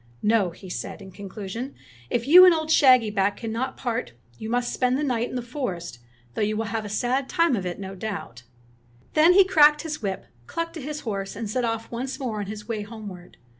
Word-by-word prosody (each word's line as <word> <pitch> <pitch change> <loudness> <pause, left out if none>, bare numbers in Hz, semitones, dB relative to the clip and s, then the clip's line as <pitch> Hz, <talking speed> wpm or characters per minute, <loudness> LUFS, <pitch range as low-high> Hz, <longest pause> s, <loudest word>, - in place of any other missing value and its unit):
"No," 210 -3 +3
he 185 +3 -12
said 180 - -5
in 190 -1 -11
conclusion, 205 +6 -7 0.3
"if 235 - -1
you 355 +5 +10
and 360 -2 +8
old 315 0 -2
shaggy 255 -8 +6
back 200 0 +1
cannot 230 +3 -3
part, 240 - -3 0.3
you 220 - -5
must 245 +1 0
spend 255 0 +1
the 300 - -1
night 245 -4 0
in - - -7
the 250 - -2
forest, 195 - -5 0.3
though - - -3
you 215 0 0
will 225 - -1
have 225 -1 -1
a 210 - -6
sad 255 +5 -1
time 335 -6 +3
of 190 -4 -3
it, 175 - -4
no 195 -1 -6
doubt." 195 - -6 0.7
Then 320 +3 +6
he 390 +1 +8
cracked 300 -4 +5
his 305 -3 -5
whip, 195 -2 -3 0.2
clucked 335 0 -3
to 320 - -7
his 300 +2 -5
horse, 200 -4 -4
and 225 +1 -4
set 245 +4 -1
off 225 -1 -3
once 255 +3 -4
more 235 -6 -3
on 205 - -4
his 210 0 -7
way 225 -3 -2
homeward. 205 -4 -10
230 Hz, 220 wpm, -25 LUFS, 205-270 Hz, 0.7 s, you